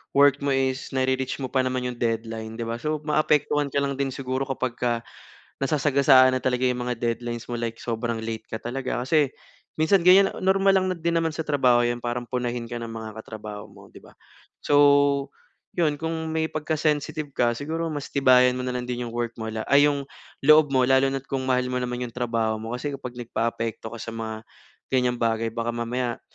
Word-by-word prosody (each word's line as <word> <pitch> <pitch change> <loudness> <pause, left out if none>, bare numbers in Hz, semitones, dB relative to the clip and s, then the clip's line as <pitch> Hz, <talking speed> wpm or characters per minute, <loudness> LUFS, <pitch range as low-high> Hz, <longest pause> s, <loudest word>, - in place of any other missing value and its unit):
work 140 0 +5
mo 140 - +2
is 130 0 -1
na-re-reach 130 +1 0
mo 130 - -3
pa 135 - +1
naman 130 0 -1
yung 125 - -7
deadline 115 -1 -2
'di 115 - -4
ba. 115 - -2
So, 155 +3 -2
maapektuhan 150 -1 +2
ka 140 - +2
lang 140 -1 -2
din 140 - +1
siguro 130 0 -2
kapagka 120 -2 -1 0.6
nasasagasaan 135 -2 +4
na - - -4
talaga 125 0 0
yung 125 0 -2
mga 125 - -1
deadlines 120 0 -2
mo 120 - -2
like 115 -1 -3
sobrang 115 -1 -2
late 110 -1 -5
ka - - -5
talaga. 130 +1 -3
Kasi 145 0 +2 0.4
minsan 160 +5 +3
ganyan, 195 +2 +7
normal 195 +1 +3
lang 185 - -1
na - - -8
din 170 0 0
naman 165 -1 -1
sa 160 - -2
trabaho 130 -5 +3
yan 120 0 0
parang 120 0 -3
punahin 120 -2 -3
ka 120 - -3
ng 115 - -5
mga 110 -1 -7
katrabaho 105 -1 -8
mo - - -16
'di - - -13
ba? - - -17 0.5
So, 145 -1 +4 0.5
yun 155 -4 +1
kung 160 0 -3
may 160 0 0
pagka-sensitive 155 -2 -2
ka 120 -1 +3
siguro 160 +7 -3
mas 145 -2 -4
tibayan 125 -2 +5
mo 125 - -3
na 125 - -2
lang 125 0 -4
din 125 0 -3
yung - - -10
work 120 0 -3
mo 110 -1 -5
la 110 0 -5
ay 145 +1 +5
yung 140 -1 -4 0.3
loob 155 0 +6
mo 130 -2 +3
lalo 135 +1 +4
na 135 - -1
at 135 - -22
kung 135 -1 -2
mahal 125 -1 +1
mo 125 - 0
naman 125 0 -3
yung 120 - -10
trabaho 115 -3 -1
mo. 115 +2 -4
Kasi 145 +3 -4
kapag 125 -3 -7
nagpa-apekto 115 -1 -3
ka 115 - -8
sa 115 0 -7
mga 110 0 -6 0.4
ganyang 125 -2 +1
bagay 115 -1 0
baka 115 +1 -3
mamaya 120 +1 -3
125 Hz, 205 wpm, -25 LUFS, 120-145 Hz, 0.6 s, ganyan